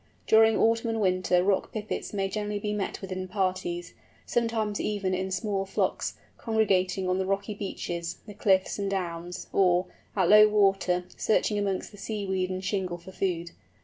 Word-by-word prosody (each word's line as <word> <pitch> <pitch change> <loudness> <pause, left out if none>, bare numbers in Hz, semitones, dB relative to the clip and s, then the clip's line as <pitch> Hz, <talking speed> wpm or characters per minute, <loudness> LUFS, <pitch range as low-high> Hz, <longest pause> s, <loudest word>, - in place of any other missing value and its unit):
During 220 0 +5
autumn 230 +1 +2
and 225 0 -1
winter 185 -2 +2
Rock 195 0 +1
Pipits 215 -1 -4
may 195 -2 -1
generally 210 +1 -3
be 210 +1 -2
met 205 -2 -3
with 190 - -6
in 185 0 -3
parties, 185 -2 -2 0.3
sometimes 225 -3 0
even 200 -3 -1
in 190 +1 -1
small 195 0 -1
flocks, 195 - -1 0.2
congregating 190 -4 +1
on 185 +1 +1
the 190 - 0
rocky 200 +2 -1
beaches, 175 -4 -4
the 210 - -9
cliffs, 190 -1 +2
and 200 -1 -1
downs, 175 -2 -4
or, 180 -1 +4 0.3
at 190 -4 +3
low 210 +2 +8
water, 195 -4 +2
searching 210 -1 +1
amongst 195 -2 -2
the 205 - -13
seaweed 190 -4 -2
and 185 0 -4
shingle 185 -4 -1
for 175 +2 -12
food. 175 -3 -2
195 Hz, 170 wpm, -28 LUFS, 185-210 Hz, 0.3 s, low